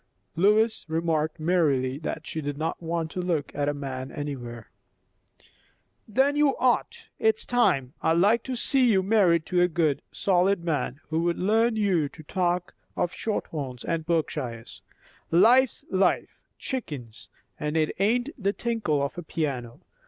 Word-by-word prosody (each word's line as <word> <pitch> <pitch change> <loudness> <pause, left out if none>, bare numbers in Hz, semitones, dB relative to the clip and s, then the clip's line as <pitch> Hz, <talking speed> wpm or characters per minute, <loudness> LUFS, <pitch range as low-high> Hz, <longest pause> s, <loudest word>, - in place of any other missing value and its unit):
Lois 215 +5 +3
remarked 160 -1 -1
merrily 145 -6 +1
that 160 0 -5
she 160 - -4
did 145 -1 -4
not 160 +3 -3
want 165 -1 -2
to 180 - -3
look 170 -6 -1
at 145 0 0
a - - +2
man 135 -2 -5
anywhere. 120 -6 -6 1.4
"Then 265 +6 +2
you 295 -2 +3
ought. 250 -2 0
It's 220 0 +2
time. 140 - +2
I'd 160 - +3
like 210 +6 +4
to 260 - -3
see 255 +1 +3
you 190 -2 +3
married 185 -6 +3
to 180 -1 +1
a 180 - +5
good, 160 -4 0
solid 190 -1 +2
man, 150 -4 -2
who 160 0 0
would 170 0 0
learn 225 +4 +2
you 185 -9 +1
to 155 - -13
talk 180 +3 -1 0.2
of 175 - -1
shorthorns 140 - -4
and 165 -1 -2
Berkshires. 150 -8 -3 0.5
Life's 235 +8 +4
life, 190 -1 +1 0.2
chickens; 140 - -6 0.3
and 150 +1 -1
it 155 -1 +1
ain't 240 +7 +2
the 200 +1 +1
tinkle 215 -13 -1
of 140 +5 -4
a - - -4
piano. 135 -8 -4
170 Hz, 150 wpm, -26 LUFS, 145-205 Hz, 1.4 s, a